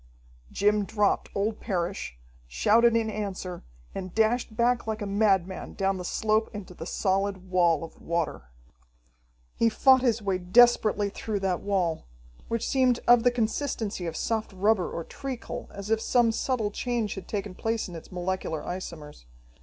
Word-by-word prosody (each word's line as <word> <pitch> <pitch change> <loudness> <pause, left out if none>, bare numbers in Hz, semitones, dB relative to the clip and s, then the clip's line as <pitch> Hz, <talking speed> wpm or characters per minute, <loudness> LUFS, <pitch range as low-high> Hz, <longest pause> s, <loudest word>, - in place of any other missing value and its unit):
Jim 210 +1 +2
dropped 205 0 0
old 210 +2 -1
Parrish, 180 - -3 0.3
shouted 230 - +4
in 225 -1 +2
answer, 195 -4 -5 0.3
and 185 -2 -6
dashed 220 +1 +1
back 240 0 +2
like 220 0 -2
a 205 - -3
madman 195 -3 0
down 195 -1 0
the 180 - -5
slope 215 +4 +1
into 195 -3 -7
the 165 -1 -8
solid 190 -1 -1
wall 170 -4 +3
of 165 - -11
water. 170 - -2 1.1
He 230 - +2
fought 260 +3 +5
his 240 -3 +2
way 195 -3 -1
desperately 210 +1 +4
through 205 -1 -3
that 185 -3 0
wall, 180 - -1 0.4
which 230 -1 -2
seemed 255 -3 +3
of 240 -1 +7
the 245 - +4
consistency 225 -5 -2
of 160 - -4
soft 220 -1 -1
rubber 195 0 +2
or 170 - -4
treacle, 260 +6 -6
as 200 +2 -7
if 220 0 +2
some 240 -1 +3
subtle 225 -2 -1
change 235 -2 -2
had 195 -3 -8
taken 200 -2 -4
place 225 +3 -2
in 180 - -10
its 165 - -10
molecular 180 -3 -3
isomers. 160 - -7
205 Hz, 160 wpm, -27 LUFS, 185-225 Hz, 1.1 s, of